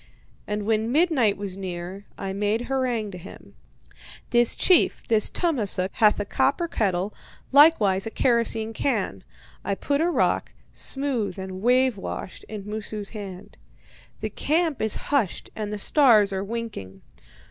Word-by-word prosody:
And 210 Hz, 0 st, -3 dB
when 220 Hz, +1 st, 0 dB
midnight 285 Hz, -, +2 dB
was 195 Hz, -2 st, -5 dB
near 185 Hz, +1 st, -6 dB
I 195 Hz, -1 st, -4 dB
made 210 Hz, +3 st, 0 dB
harangue 245 Hz, -5 st, -1 dB
to 180 Hz, -, -8 dB
him. -, -, -13 dB, 0.8 s
"'This 240 Hz, -1 st, +4 dB
chief, 365 Hz, -3 st, +3 dB
this 220 Hz, -2 st, +3 dB
Tummasook, 210 Hz, -, 0 dB
hath 215 Hz, -3 st, +3 dB
a 205 Hz, -, -2 dB
copper 340 Hz, -, +1 dB
kettle, 195 Hz, -, -1 dB, 0.4 s
likewise 225 Hz, -10 st, +5 dB
a -, -, -2 dB
kerosene 225 Hz, -2 st, +1 dB
can.' 210 Hz, -, -2 dB, 0.4 s
I 200 Hz, -, -1 dB
put 285 Hz, +8 st, -1 dB
a 340 Hz, -, +2 dB
rock, -, -, 0 dB, 0.2 s
smooth 270 Hz, -8 st, -2 dB
and 190 Hz, 0 st, -6 dB
wave 250 Hz, 0 st, +3 dB
washed, 190 Hz, -, -7 dB
in 210 Hz, -2 st, -7 dB
Moosu's 210 Hz, -1 st, -5 dB
hand. 200 Hz, -2 st, -9 dB, 0.6 s
'The -, -, -3 dB
camp 320 Hz, -1 st, 0 dB
is 220 Hz, -1 st, +2 dB, 0.2 s
hushed 235 Hz, -11 st, 0 dB
and 210 Hz, -1 st, -4 dB
the 210 Hz, -, -3 dB
stars 215 Hz, -4 st, +4 dB
are 190 Hz, 0 st, -2 dB
winking. 200 Hz, -, -6 dB
215 Hz, 145 wpm, -24 LUFS, 195-255 Hz, 0.8 s, likewise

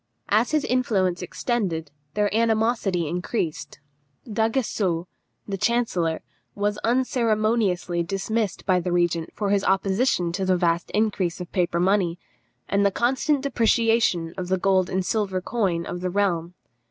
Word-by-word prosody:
As 220 Hz, +4 st, +3 dB
his 305 Hz, -2 st, +1 dB
influence 195 Hz, -8 st, +1 dB
extended, 180 Hz, -, -2 dB, 0.2 s
their 205 Hz, 0 st, +1 dB
animosity 220 Hz, -6 st, +1 dB
increased. 170 Hz, -3 st, -3 dB, 0.5 s
D'Aguesseau, 220 Hz, -6 st, 0 dB, 0.4 s
the 195 Hz, -2 st, -4 dB
chancellor, 185 Hz, -9 st, 0 dB, 0.3 s
was 205 Hz, +1 st, -1 dB
unceremoniously 220 Hz, -8 st, +1 dB
dismissed 195 Hz, +4 st, -2 dB
by 185 Hz, -2 st, +3 dB
the 180 Hz, 0 st, -3 dB
regent 175 Hz, -2 st, +1 dB
for 200 Hz, -1 st, -1 dB
his 200 Hz, -1 st, +2 dB
opposition 190 Hz, -1 st, +1 dB
to 190 Hz, +3 st, -2 dB
the 185 Hz, -1 st, +2 dB
vast 170 Hz, -1 st, 0 dB
increase 205 Hz, -5 st, 0 dB
of 180 Hz, -, -7 dB
paper 175 Hz, -2 st, 0 dB
money, 180 Hz, -2 st, +2 dB, 0.5 s
and 200 Hz, 0 st, +2 dB
the 200 Hz, -, +5 dB
constant 265 Hz, +7 st, +1 dB
depreciation 225 Hz, -9 st, +2 dB
of 180 Hz, -, -3 dB
the 190 Hz, +1 st, +1 dB
gold 185 Hz, -1 st, +2 dB
and 185 Hz, 0 st, -1 dB
silver 200 Hz, -3 st, 0 dB
coin 185 Hz, -5 st, -1 dB
of 175 Hz, -, -5 dB
the 180 Hz, -, -1 dB
realm. 180 Hz, -3 st, 0 dB
195 Hz, 140 wpm, -24 LUFS, 175-225 Hz, 0.5 s, the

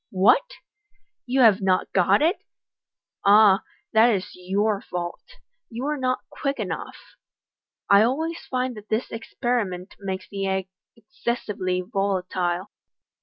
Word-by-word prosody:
" -, -, -57 dB, 0.2 s
What! -, -, +4 dB, 0.7 s
you 260 Hz, +2 st, +2 dB
have 215 Hz, -4 st, +6 dB
not 185 Hz, -1 st, +1 dB
got 195 Hz, +7 st, +4 dB
it? 340 Hz, +6 st, +3 dB, 0.9 s
Ah, 205 Hz, 0 st, +6 dB, 0.3 s
that 220 Hz, +2 st, +6 dB
is 190 Hz, -5 st, -1 dB
your 200 Hz, +3 st, -1 dB
fault 175 Hz, -1 st, -5 dB
j -, -, -16 dB, 0.3 s
you 235 Hz, +2 st, -6 dB
were 300 Hz, +2 st, 0 dB
not 255 Hz, -2 st, -1 dB
quick 275 Hz, -1 st, -2 dB
enough. -, -, -4 dB, 0.9 s
I 200 Hz, 0 st, +6 dB
always 315 Hz, +9 st, 0 dB
find 255 Hz, 0 st, -1 dB
that 210 Hz, 0 st, -12 dB
this 220 Hz, +3 st, -1 dB
experiment 225 Hz, -5 st, -3 dB
makes 190 Hz, -1 st, -5 dB
the 195 Hz, -1 st, -3 dB
egg 190 Hz, -1 st, -1 dB, 0.3 s
excessively 210 Hz, -4 st, -3 dB
volatile." 185 Hz, -2 st, -1 dB
205 Hz, 130 wpm, -24 LUFS, 190-245 Hz, 0.9 s, have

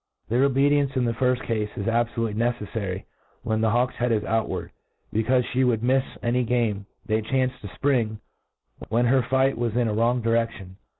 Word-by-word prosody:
Their 125 Hz, +4 st, +3 dB
obedience 140 Hz, 0 st, +2 dB
in 130 Hz, -2 st, +1 dB
the 115 Hz, -, +1 dB
firfl: 125 Hz, +1 st, +1 dB
cafe 115 Hz, -2 st, -1 dB, 0.2 s
is 100 Hz, -, -3 dB
abfolutely 115 Hz, -1 st, 0 dB
neceffary 105 Hz, -4 st, -2 dB, 0.4 s
when 110 Hz, -2 st, 0 dB
the 110 Hz, -, +3 dB
hawk's 120 Hz, +3 st, +1 dB
head 125 Hz, 0 st, 0 dB
is 105 Hz, -2 st, +1 dB
outwatd, 110 Hz, +1 st, -2 dB, 0.4 s
becaufe 125 Hz, +3 st, +2 dB
fhe 130 Hz, +1 st, +2 dB
Would 115 Hz, -3 st, +1 dB
mifs 130 Hz, +2 st, +1 dB
any 125 Hz, +1 st, +1 dB
game 110 Hz, -4 st, 0 dB, 0.2 s
they 110 Hz, 0 st, +1 dB
chanced 130 Hz, +2 st, -1 dB
to 105 Hz, -, -7 dB
fpring 115 Hz, -1 st, 0 dB, 0.7 s
when 120 Hz, +2 st, +2 dB
her 130 Hz, +2 st, +4 dB
fight 130 Hz, +1 st, +1 dB
was 120 Hz, -2 st, -1 dB
in 120 Hz, -2 st, +2 dB
a 110 Hz, -, -1 dB
wrong 120 Hz, +2 st, +1 dB
direftion. 115 Hz, -5 st, -1 dB
120 Hz, 180 wpm, -25 LUFS, 110-125 Hz, 0.7 s, her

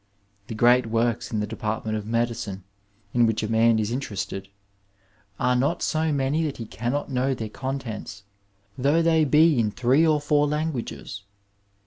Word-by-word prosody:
The 115 Hz, -, -6 dB
great 120 Hz, +2 st, +4 dB
works 115 Hz, +1 st, 0 dB
in 110 Hz, -2 st, -1 dB
the -, -, -1 dB
department 110 Hz, 0 st, -3 dB
of 105 Hz, -1 st, -5 dB
medicine 115 Hz, -4 st, -2 dB, 0.5 s
in 120 Hz, -1 st, +4 dB
which 110 Hz, -1 st, -1 dB
a -, -, -1 dB
man 115 Hz, +1 st, +3 dB
is 110 Hz, 0 st, -1 dB
interested, 100 Hz, -6 st, -4 dB, 0.9 s
are 125 Hz, 0 st, +2 dB
not 135 Hz, +7 st, 0 dB
so 160 Hz, 0 st, 0 dB
many 140 Hz, +3 st, 0 dB
that 145 Hz, -, -4 dB
he 115 Hz, -, -6 dB
cannot 125 Hz, +7 st, -3 dB
know 130 Hz, +1 st, 0 dB
their 110 Hz, -3 st, -5 dB
contents, 120 Hz, -5 st, -6 dB, 0.5 s
though 145 Hz, +6 st, +2 dB
they 160 Hz, -1 st, +3 dB
be 150 Hz, 0 st, +4 dB
in 110 Hz, -2 st, +2 dB
three 130 Hz, +7 st, +2 dB
or 155 Hz, -1 st, +3 dB
four 145 Hz, 0 st, +2 dB
languages. 150 Hz, -9 st, -4 dB
120 Hz, 160 wpm, -25 LUFS, 110-145 Hz, 0.9 s, great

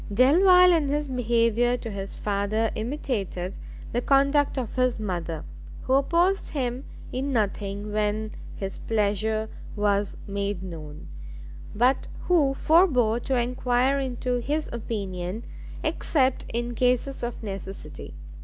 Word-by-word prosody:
Delvile 360 Hz, -, +6 dB
in 315 Hz, -4 st, +2 dB
his 295 Hz, +1 st, 0 dB
behaviour 240 Hz, -1 st, +2 dB
to 230 Hz, -2 st, -6 dB
his 195 Hz, -1 st, -5 dB
father 210 Hz, +2 st, 0 dB
imitated 215 Hz, -7 st, -3 dB, 0.3 s
the 240 Hz, -, 0 dB
conduct 280 Hz, +2 st, +3 dB
of 245 Hz, -4 st, -3 dB
his 255 Hz, -2 st, +1 dB
mother, 170 Hz, -6 st, -3 dB, 0.4 s
who 260 Hz, -, 0 dB
opposed 340 Hz, +8 st, +2 dB
him 255 Hz, -2 st, -2 dB, 0.3 s
in 270 Hz, +2 st, -1 dB
nothing 205 Hz, -2 st, -1 dB
when 215 Hz, +1 st, -1 dB, 0.2 s
his 195 Hz, -1 st, -5 dB
pleasure 215 Hz, 0 st, 0 dB, 0.3 s
was 205 Hz, -1 st, +1 dB
made 200 Hz, -1 st, -3 dB
known, 155 Hz, -4 st, -8 dB, 0.7 s
but 250 Hz, +5 st, +2 dB, 0.2 s
who 295 Hz, -7 st, +3 dB
forbore 270 Hz, -, +4 dB
to 260 Hz, +2 st, -1 dB
enquire 250 Hz, +2 st, +1 dB
into 250 Hz, -1 st, -1 dB
his 295 Hz, +5 st, -2 dB
opinion 200 Hz, -3 st, -4 dB, 0.4 s
except 265 Hz, -4 st, +1 dB
in 240 Hz, +1 st, -2 dB
cases 250 Hz, +3 st, +1 dB
of 240 Hz, -1 st, -4 dB
necessity. 195 Hz, -, -7 dB
235 Hz, 120 wpm, -26 LUFS, 205-270 Hz, 0.7 s, Delvile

